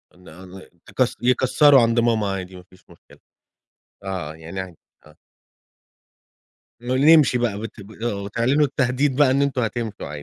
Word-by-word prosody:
إن 90 0 -20
أن 90 +3 -14
يك 95 +7 -4
يكسّروا 130 +2 +4
عند 115 +1 +1
ماما 115 -3 +1
عادي 95 -1 -6
ما 90 - -12
فيش 90 0 -25
مشكلة. - - -20 0.8
آه، 90 -6 -5
يعني 80 +4 -9
ع 95 -2 -7 0.3
آه. 75 0 -19 1.7
ن 120 - -12 0.2
نمشي 155 -5 +5
بقى 110 -4 -2
بت 110 0 -10
آه، 120 -4 -2
وتعلنوا 120 +8 +1
التهديد 135 0 -1
بقى 140 -2 +3
إن 140 +1 +1
أنتم 140 -2 -1
هتمشوا 110 -9 -5
115 Hz, 145 wpm, -21 LUFS, 95-130 Hz, 1.7 s, نمشي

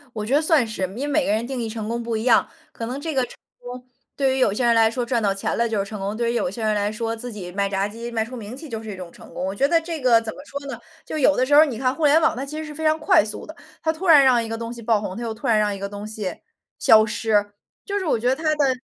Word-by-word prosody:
我 215 -1 -3
觉 240 - -2
得 290 - +4
算 315 -5 +3
是， 220 -3 -5
因 185 0 -2
为 290 - -1
每 290 -1 +1
个 - - +1
人 220 +2 0
定 255 -1 -4
义 230 - -2
成 220 -1 -5
功 235 +1 -2
不 230 -1 -3
一 220 - -2
样， 245 - +4 0.2
可 230 - -6
能 255 +4 -5
这 320 +1 -3
个 265 - +2
成 - - -14 0.2
功， 245 +1 -9 0.3
对 270 -2 +1
于 265 - -1
有 210 -6 +3
些 245 - -1
人 235 -1 +4
来 225 -1 +5
说， 245 +1 -3
赚 235 -1 0
到 200 -2 +2
钱 195 - -2
了 235 - +2
就 225 -2 -2
是 200 - +1
成 205 +1 -7
功， 200 +2 -3
对 235 +1 0
于 - - -3
有 230 - 0
些 220 +5 -6
人 215 0 +2
来 205 0 0
说， 225 +1 -3
自 235 +1 -7
己 185 -4 -7
卖 200 +2 0
炸 195 0 -1
鸡 230 +3 -6
卖 225 -2 -1
出 230 +3 -10
名 220 +1 -7
气 300 +3 -10
就 225 -2 -5
是 220 - -8
一 - - -7
种 180 -2 -9
成 - - -15
功。 180 - -3
我 190 - -2
觉 270 +8 +2
得 330 +3 +3
这 325 -1 -5
个 245 -4 +4
怎 225 -1 -6
么 - - -13
说 280 0 -6
呢， 235 - -7 0.2
就 - - -5
有 290 0 +4
的 255 - +2
时 285 - 0
候 290 - +9
儿 310 - +8
你 260 -7 -4
看 255 +1 +1
互 315 +2 -1
联 295 +3 +5
网， 320 - +3
它 265 +3 -4
其 300 +2 -7
实 315 - -4
是 305 -1 -8
非 310 - -8
常 310 0 +3
快 330 0 +4
速 215 - -7
的， 315 - -9 0.3
它 320 - +2
突 335 +4 -5
然 300 -4 +8
让 255 -3 +4
一 230 - -5
个 225 0 -4
东 230 0 -5
西 235 - -10
爆 220 -2 +1
红， 190 -2 -5
它 240 - -5
又 230 -1 -3
突 220 - -6
然 220 -2 +4
让 210 -1 +1
一 - - -7
个 200 0 -4
东 205 +1 -7
西 215 -4 -5 0.4
消 220 -1 +6
失， 210 -1 0 0.3
就 405 0 -2
是 380 - -4
我 305 - +2
觉 240 +3 0
得 260 - +1
它 320 - -9
的 280 -3 +2
235 Hz, 370 characters per minute, -23 LUFS, 215-275 Hz, 0.4 s, 候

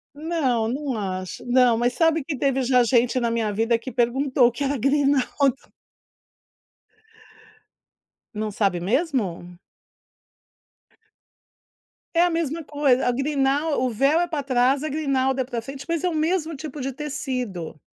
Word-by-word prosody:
Não, 290 -8 0
não 270 +1 -3
acho. 185 -2 -5
Não, 245 -1 +4
mas 240 +1 +1
sabe 325 0 +2
que 290 0 -4
teve 270 0 +1
já 250 -1 +3
gente 240 +1 +2
na 235 -1 0
minha 225 -2 0
vida 225 +3 +1
que 260 +2 -7
perguntou 250 +2 +2
o - - 0
que 240 +5 -4
era 280 0 0
grinalda. 275 0 +2 2.8
Não 215 0 -2
sabe 195 -3 0
mesmo? 200 - -1 2.6
É 335 - +5
a 355 - +4
mesma 330 -1 -2
coisa. 285 -4 +1
A - - +3
grinal 280 +2 0
o 255 - +1
véu 275 +8 +2
é 350 - +1
pra 305 -4 -3
trás, 260 +1 +2
grinalda 270 -3 0
é - - +1
pra 240 -3 -4
frente, 275 +1 -8
mas 335 -2 -1
é 360 - +2
o - - -4
mesmo 320 0 0
tipo 295 0 -7
de 270 +1 -2
tecido. 250 - -5
265 Hz, 145 wpm, -23 LUFS, 240-295 Hz, 2.8 s, É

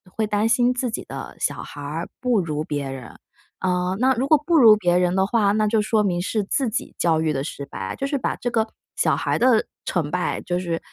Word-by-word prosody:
会 220 - 0
担 210 +1 +1
心 245 +2 +3
自 250 0 -2
己 - - -4
的 - - -8
小 - - -2
孩 145 - -10
儿 155 +4 -5
不 250 -4 +2
如 155 -4 -2
别 145 -3 -3
人。 130 -4 -9 0.5
嗯， 180 0 0
那 260 +2 +4
如 255 +2 -1
果 310 - +6
不 340 +1 +2
如 225 -7 +8
别 175 -4 +1
人 180 0 +1
的 190 0 +3
话， 205 -1 +2
那 215 +1 +2
就 215 0 +2
说 215 0 +1
明 175 -3 0
是 210 +3 -1
自 250 +5 0
己 220 - -4
教 165 -2 +2
育 160 -1 0
得 135 -1 -2
失 140 -1 -6
败， 95 -7 -6
就 275 - -3
是 275 - -2
把 - - -1
这 245 - -3
个 225 -1 +1 0.3
小 - - +2
孩 - - -1
的 240 -3 +4 0.2
成 160 -5 -2
败 180 0 -1
就 180 0 -2
是 170 -2 -2
200 Hz, 260 characters per minute, -23 LUFS, 165-230 Hz, 0.5 s, 如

